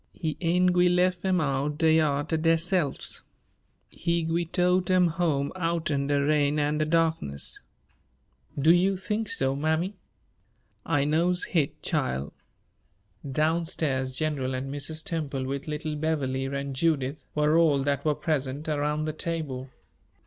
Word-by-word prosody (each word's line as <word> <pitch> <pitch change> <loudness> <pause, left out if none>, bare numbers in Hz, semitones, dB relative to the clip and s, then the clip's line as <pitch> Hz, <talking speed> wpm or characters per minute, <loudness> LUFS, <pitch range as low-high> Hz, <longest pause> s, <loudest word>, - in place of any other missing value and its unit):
He 160 -4 -3
ain' 180 +1 +3
gwi' 180 0 +4
lef 180 0 +2
'em 185 -1 +2
out 145 0 -1
d'yar 155 -3 +3
ter 160 - -2
deyselves. 165 0 +1 0.7
He 170 0 -1
gwi' 165 +1 -1
tote 180 0 +2
'em 180 -2 +4
home 155 -4 0
outen' 165 -5 -1
de 145 0 +2
rain 145 0 +2
an' 150 +1 0
de 155 - +2
darkness." 160 - -1 1.0
"Do 155 +4 +5
you 190 +2 +2
think 210 +3 -2
so, 135 0 +2
mammy?" 160 +6 0 0.9
"I 145 -3 +2
knows 170 +4 +2
hit, 155 -6 -1
chile." 65 +3 -1 1.0
Down 160 +4 +1
stairs, 130 -6 -1
General 135 -4 -1
and 135 +2 -4
Mrs. 155 +3 -2
Temple, 145 -5 -3
with 140 +2 -4
little 155 0 -3
Beverley 145 -4 -1
and 140 0 -4
Judith, 145 -1 0
were 150 +1 +3
all 155 -5 +4
that 140 0 0
were 150 -1 +1
present 145 -2 -2
around 150 0 0
the 155 - -2
table. 155 -6 -4
155 Hz, 140 wpm, -27 LUFS, 140-170 Hz, 1.0 s, Do